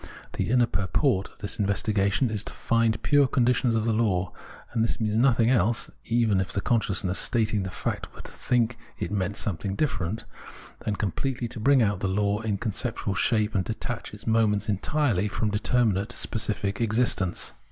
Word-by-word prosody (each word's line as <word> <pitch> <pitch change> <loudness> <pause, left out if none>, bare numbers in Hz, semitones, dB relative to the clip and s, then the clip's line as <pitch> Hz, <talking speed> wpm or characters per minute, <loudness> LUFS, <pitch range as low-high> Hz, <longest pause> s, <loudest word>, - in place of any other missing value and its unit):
The - - -2
inner 125 0 +4
purport 100 - 0
of - - -24
this 100 - -3
investigation 100 +3 +1
is 105 -1 -1
to - - -6
find 115 -1 +1
pure 145 -2 +4
conditions 125 -1 +2
of 110 -1 0
the 115 - +2
law; 95 -7 +1 0.4
and 115 -2 +2
this 115 - -1
means 110 -2 0
nothing 120 -1 +4
else 115 -1 +1
(even 115 -5 +2
if 95 - -4
the - - -1
consciousness 100 -4 +1
stating 110 -3 +1
the 95 - -4
fact 90 - -3
were - - -9
to - - -11
think 120 -1 0 0.2
it - - -4
meant 100 0 -1
something 95 0 -3
different) 105 - -2 0.5
than 105 - -2
completely 120 +5 -2
to 120 - -6
bring 135 +2 +4
out 100 -3 0
the 95 - -1
law 100 +2 +1
in 110 -3 -1
conceptual 110 -1 -2
shape 110 +2 +1
and 95 -2 0
detach 115 +1 -4
its 105 +1 -11
moments 110 -2 +2
entirely 105 0 +1
from 105 +1 -1
determinate 110 0 +1
specific 105 -3 -2
existence. 110 -5 +1
110 Hz, 175 wpm, -26 LUFS, 100-120 Hz, 0.5 s, inner